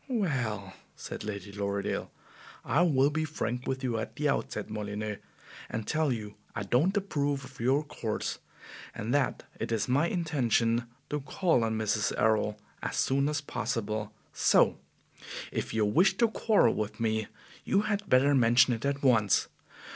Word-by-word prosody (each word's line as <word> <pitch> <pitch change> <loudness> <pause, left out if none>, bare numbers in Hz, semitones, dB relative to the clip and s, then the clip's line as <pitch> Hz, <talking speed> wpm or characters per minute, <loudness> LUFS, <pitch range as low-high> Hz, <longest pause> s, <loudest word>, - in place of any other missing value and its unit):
"Well," 125 - -1 0.2
said - - -7
Lady 100 -2 -5
Lorridaile, 100 0 -2 0.6
"I 145 +7 +2
will 145 -5 +4
be 155 +1 0
frank 125 -5 -3
with 130 0 -2
you 120 -3 0
at 110 - -5
the 150 0 0
outset, 105 -6 -2
Molyneux, 105 0 -4 0.5
and 110 -1 -3
tell 155 -2 +1
you 105 -4 -4 0.2
I - - -2
don't 170 - +2
approve 145 -8 -1
of 130 +1 -14
your 130 +5 +2
course, 115 -7 -4 0.6
and 115 +2 -3
that 145 -3 +1 0.2
it - - -3
is 110 -2 0
my 140 +6 +3
intention 120 -9 +1 0.3
to 150 - 0
call 145 -2 +1
on 110 -1 0
Mrs. 110 -1 0
Errol 105 -1 +2 0.2
as - - -3
soon 140 +2 +2
as 150 +1 -1
possible; 110 -5 -3 0.2
so - - +4 0.7
if - - -3
you 110 -1 +2
wish 185 - +3
to 235 -1 +4
quarrel 220 -1 +3
with 105 0 -3
me, 110 -2 0 0.4
you 195 - +2
had 205 -1 -2
better 135 +3 +5
mention 120 -1 +5
it 115 - -4
at 140 0 -1
once. 115 -7 +3
125 Hz, 160 wpm, -29 LUFS, 110-150 Hz, 0.7 s, better